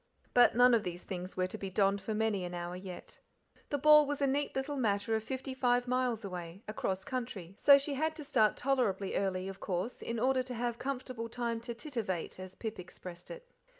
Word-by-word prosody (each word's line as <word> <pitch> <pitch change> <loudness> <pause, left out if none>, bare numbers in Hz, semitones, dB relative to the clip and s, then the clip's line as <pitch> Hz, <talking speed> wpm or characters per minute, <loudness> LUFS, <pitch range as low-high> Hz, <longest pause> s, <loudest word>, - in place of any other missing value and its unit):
But 245 -2 +6
none 245 +1 +7
of 230 - +5
these 175 -2 -5
things 185 0 -6
were 185 - +2
to 210 +4 -6
be 195 - -4
donned 195 +1 +2
for 220 - -3
many 215 -3 +1
an 175 0 -4
hour 175 0 -4
yet. 185 -1 -9 0.5
The 290 - 0
ball 300 +1 +7
was 290 -1 -2
a 280 - +3
neat 280 +2 0
little 270 +2 -2
matter 215 -2 +1
of 220 - -1
fifty 260 +2 -4
five 245 -1 +2
miles 250 -3 0
away, 180 +1 -7
across 190 -3 -2
country, 225 -9 -4
so 280 -1 +9
she 280 +1 -2
had 315 +3 0
to 310 - -7
start 220 -7 +3
tolerably 240 -8 0
early, 190 -1 0
of 195 0 -7
course, 185 +6 -3
in 230 - -3
order 260 +2 +3
to 255 -1 -6
have 235 0 -2
comfortable 255 -3 -4
time 235 -1 -2
to 235 0 -6
"titivate," 230 - -4
as 185 0 -8
Pip 220 -1 -5
expressed 180 0 -9
it. - - -9
230 Hz, 215 wpm, -32 LUFS, 190-260 Hz, 0.5 s, so